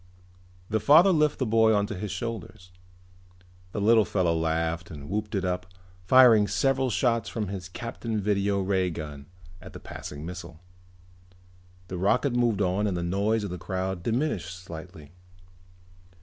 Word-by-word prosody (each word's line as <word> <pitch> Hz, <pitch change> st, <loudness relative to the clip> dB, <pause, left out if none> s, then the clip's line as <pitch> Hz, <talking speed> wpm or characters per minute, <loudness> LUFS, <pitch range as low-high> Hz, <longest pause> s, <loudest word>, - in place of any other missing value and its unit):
The 110 Hz, -, +2 dB
father 160 Hz, -, +6 dB
lifted 150 Hz, -3 st, +2 dB
the 130 Hz, -, -1 dB
boy 110 Hz, -1 st, +4 dB
onto 100 Hz, +1 st, 0 dB
his 105 Hz, +2 st, -5 dB
shoulders. 100 Hz, -4 st, -6 dB, 1.0 s
The -, -, -4 dB
little 110 Hz, +2 st, +5 dB
fellow 90 Hz, -5 st, 0 dB
laughed 80 Hz, +1 st, -1 dB
and 70 Hz, -3 st, -9 dB
whooped 105 Hz, +1 st, -2 dB
it 95 Hz, -, -1 dB
up, 90 Hz, 0 st, -2 dB, 0.4 s
firing 120 Hz, -5 st, +7 dB
several 130 Hz, +7 st, +1 dB
shots 115 Hz, -1 st, +1 dB
from 105 Hz, -4 st, -3 dB
his 95 Hz, -2 st, -6 dB
Captain 115 Hz, +1 st, -4 dB
Video 100 Hz, 0 st, 0 dB
Ray 95 Hz, -1 st, +1 dB
gun 75 Hz, -4 st, -7 dB, 0.3 s
at -, -, -12 dB
the -, -, -9 dB
passing 75 Hz, +1 st, -8 dB
missile. 85 Hz, -2 st, -8 dB, 1.3 s
The 90 Hz, -1 st, -5 dB
rocket 120 Hz, +8 st, +2 dB
moved 115 Hz, -4 st, +2 dB
on 95 Hz, +3 st, 0 dB
and 95 Hz, -3 st, -1 dB
the 85 Hz, -, -3 dB
noise 100 Hz, +5 st, 0 dB
of 100 Hz, -, -4 dB
the 90 Hz, -, -5 dB
crowd 95 Hz, 0 st, -3 dB
diminished 115 Hz, -, -2 dB
slightly. 85 Hz, -3 st, -10 dB
100 Hz, 150 wpm, -27 LUFS, 90-115 Hz, 1.3 s, firing